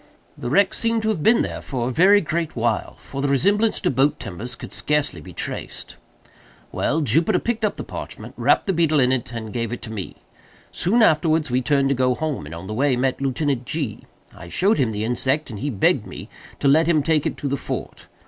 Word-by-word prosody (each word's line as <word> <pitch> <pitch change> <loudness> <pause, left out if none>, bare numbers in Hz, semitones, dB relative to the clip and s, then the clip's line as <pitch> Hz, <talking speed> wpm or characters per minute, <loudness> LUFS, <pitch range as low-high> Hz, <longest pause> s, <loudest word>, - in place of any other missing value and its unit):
The 120 - -5
wreck 195 +7 +3
seemed 230 -1 0
to 220 - +1
have 205 -8 -1
been 225 +8 +4
there - - -5
for 125 -3 -3
a - - -1
very 195 +9 +5
great 165 -2 -2
while; 115 -2 -1
for 135 - -7
the 145 - +1
resemblance 205 - +2
to 180 - +1
boat 135 +3 +2
timbers 110 +5 -6
could - - -10
scarcely 150 - 0
be - - -11
traced. - - -6 0.8
"Well, 160 +2 0
Jupiter 165 - +2
picked 230 +3 -2
up 210 - 0
the - - -4
parchment, - - -8
wrapped - - +2
the 195 - +1
beetle 160 -3 +2
in 125 -1 +3
it, 125 -2 -1
and 110 -3 -6
gave 115 -2 -2
it 120 - -6
to 110 - -6
me. 100 -4 -6 0.6
Soon 220 +7 +2
afterwards 155 - +3
we 125 +1 +2
turned 140 +1 +2
to - - +3
go 125 -1 +1
home, 150 - -3
and 80 - -8
on 85 +3 -8
the 105 - -5
way 135 +3 +2
met 130 +2 -1
Lieutenant 135 -1 -1
G——. 140 -8 -4 0.3
I 85 - -11
showed 195 - +2
him 125 -5 +2
the 105 0 -3
insect, 130 +5 0
and 105 - -7
he 145 - -2
begged 105 -8 +1
me - - -9 0.3
to 140 - +2
let 155 +4 +5
him 155 -4 +3
take 155 -1 +2
it - - -4
to 145 - -3
the 140 - 0
fort. - - -6
140 Hz, 225 wpm, -22 LUFS, 120-165 Hz, 0.8 s, very